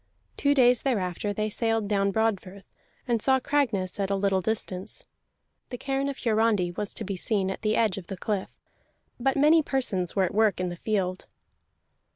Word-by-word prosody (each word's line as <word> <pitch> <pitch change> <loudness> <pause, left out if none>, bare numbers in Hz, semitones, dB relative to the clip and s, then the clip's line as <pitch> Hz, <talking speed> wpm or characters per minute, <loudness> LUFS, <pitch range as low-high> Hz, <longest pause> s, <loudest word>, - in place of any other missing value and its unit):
Two 285 0 +2
days 250 -2 +5
thereafter 205 -6 -1
they 215 +1 -1
sailed 225 0 -1
down 200 -1 +1
Broadfirth, 200 -2 -1 0.4
and 235 -3 +1
saw 265 +2 +3
Cragness 235 -10 0
at 195 -1 0
a 200 - +1
little 195 -1 +1
distance. 190 -2 -4 0.6
The 245 - -5
cairn 275 +2 -1
of 275 - -5
Hiarandi 220 -6 +1
was 200 +3 -5
to - - -4
be 195 0 -4
seen 190 0 0
at - - -6
the 215 0 +1
edge 215 -4 +1
of 175 - -13
the 195 - -6
cliff, 200 0 -2 0.7
but 270 +2 +1
many 305 +3 +5
persons 210 - -2
were 195 - +3
at 185 - -1
work 215 -3 +2
in 180 0 -1
the 175 - -5
field. 185 -1 -2
210 Hz, 185 wpm, -27 LUFS, 190-240 Hz, 0.7 s, days